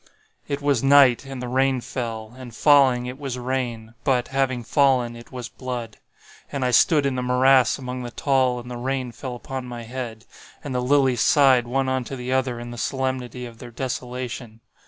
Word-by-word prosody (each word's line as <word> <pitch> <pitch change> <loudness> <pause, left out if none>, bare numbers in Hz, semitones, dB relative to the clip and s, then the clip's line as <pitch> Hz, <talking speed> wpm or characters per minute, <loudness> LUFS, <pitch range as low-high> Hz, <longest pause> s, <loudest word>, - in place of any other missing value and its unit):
"It 140 0 -3
was 140 -5 +2
night, 135 -2 +5
and 135 -2 -6
the - - -4
rain 130 +1 +2
fell; 115 -3 -5
and 125 -3 -10
falling, 135 -4 +5
it 125 +2 -7
was 135 -3 -4
rain, 120 -3 -3
but, 125 -3 +1
having 130 -2 0
fallen, 130 -2 +2
it 120 0 -13
was 125 -3 -6
blood. 120 -4 -6 0.5
And 135 -2 -2
I 125 - +1
stood 145 +4 +4
in 140 - +1
the 125 - -2
morass 125 0 +4
among 125 -1 -5
the 120 - -5
tall 130 0 +1
and 125 +1 -9
the 120 - -5
rain 130 0 -2
fell 125 +1 -6
upon 130 +1 -6
my 120 -1 -7
head—and 120 +3 -8
the 125 - 0
lilies 130 -1 +3
sighed 130 -4 +5
one 135 +2 0
unto 130 0 -2
the 125 0 -5
other 130 -2 0
in 120 0 -7
the 120 - -7
solemnity 130 -2 -3
of 115 -1 -11
their 120 - -9
desolation. 125 -2 -5
125 Hz, 190 wpm, -23 LUFS, 120-135 Hz, 0.5 s, night